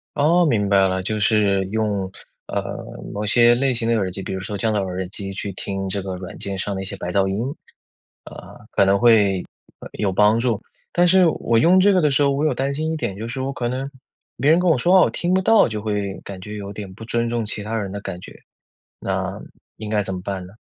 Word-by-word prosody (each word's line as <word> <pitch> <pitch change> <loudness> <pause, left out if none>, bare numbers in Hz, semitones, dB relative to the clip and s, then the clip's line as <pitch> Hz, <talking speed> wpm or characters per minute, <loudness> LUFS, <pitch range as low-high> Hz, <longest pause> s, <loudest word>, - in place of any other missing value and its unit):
哦， 170 +4 +4
明 105 -8 +1
白 95 -1 +4
了， 95 0 -2
就 105 +2 -2
是 100 -2 +2
用 100 -2 -2 0.4
呃， - - -2 0.5
某 105 +1 -3
些 120 +3 +5
类 135 +1 +1
型 115 -1 -2
的 115 - +2
耳 95 -4 0
机 95 +1 -6
比 95 - -5
如 95 - -4
说 100 +2 -5
降 110 +2 0
噪 100 -2 0
耳 90 0 -4
机 100 -1 -4
去 100 +1 -4
听 95 +1 -4
这 100 +1 -2
个 95 -1 -5
软 90 0 -8
件 100 -1 -3
上 100 +1 -2
的 95 - -3
一 - - -5
些 100 - -4
白 90 - -5
噪 95 +1 +2
音， 115 +9 -2 0.7
啊， - - -12
可 100 - +3
能 100 +1 +3
会 105 -6 +4 0.5
有 100 -3 -1
帮 105 +4 +4
助。 115 -3 0 0.3
但 175 0 +3
是 185 0 +5
我 115 -7 +1
用 180 +6 +5
这 200 +1 +5
个 185 - +3
的 150 - +3
时 145 +2 +3
候 140 - +3
我 140 +2 -1
有 155 - +2
担 135 +1 -1
心 155 +2 -2
一 160 - -2
点， 120 -8 -3
就 110 - -5
是 125 +3 -5
我 135 +1 -3
可 120 -2 -2
能 130 +2 -3 0.5
别 140 +4 +2
人 165 - +5
跟 180 -1 +2
我 155 - +4
说 175 +9 +2
话 185 - +8
我 - - +4
听 175 +1 -1
不 190 - +3
到， 220 -2 +5
就 105 -2 -4
会 105 -2 -3
感 95 -2 -8
觉 105 +2 -7
有 100 -1 -6
点 100 -2 -8
不 115 - -10
尊 115 0 -1
重 115 -2 -1
其 105 0 -2
他 110 +2 -3
人 100 -3 -3
的 100 +1 -6
感 90 - -6
觉， - - -12 0.6
那 - - -3 0.4
应 110 - -6
该 105 -1 +1
怎 95 -1 -2
么 90 - -5
办 95 -2 -4
呢？ 100 - -16
105 Hz, 275 characters per minute, -21 LUFS, 95-130 Hz, 0.7 s, 话